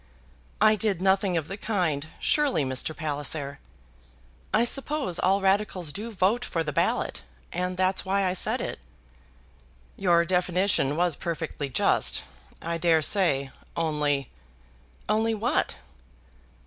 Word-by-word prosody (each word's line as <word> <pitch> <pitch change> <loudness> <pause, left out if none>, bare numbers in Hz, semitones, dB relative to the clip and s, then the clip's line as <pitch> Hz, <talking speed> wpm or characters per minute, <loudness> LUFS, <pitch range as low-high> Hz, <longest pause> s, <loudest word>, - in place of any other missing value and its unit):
"I 215 +1 +5
did 205 -3 0
nothing 190 -1 +2
of 160 -2 -2
the 195 - -6
kind, 175 -9 -1
surely, 285 - +2
Mr. 130 +4 -2
Palliser. 145 -2 -2 0.9
I 230 - +3
suppose 275 - 0
all 195 +2 +2
Radicals 190 -5 +1
do 225 +3 -6
vote 210 +5 +1
for 165 -7 -2
the 150 -2 -4
ballot, - - 0 0.3
and 180 +1 -2
that's 185 0 +1
why 195 +1 +1
I 180 - +1
said 185 - +2
it." - - -4 1.2
"Your 170 -3 +3
definition 180 -4 +1
was 175 -1 +1
perfectly 165 -4 -4
just, - - +2 0.4
I 170 0 -2
dare 165 -2 +3
say, 140 -8 +2 0.3
only 150 -4 0 0.4
" - - -31
"Only 220 +2 +1
what?" 235 +7 0
180 Hz, 130 wpm, -26 LUFS, 155-200 Hz, 1.2 s, I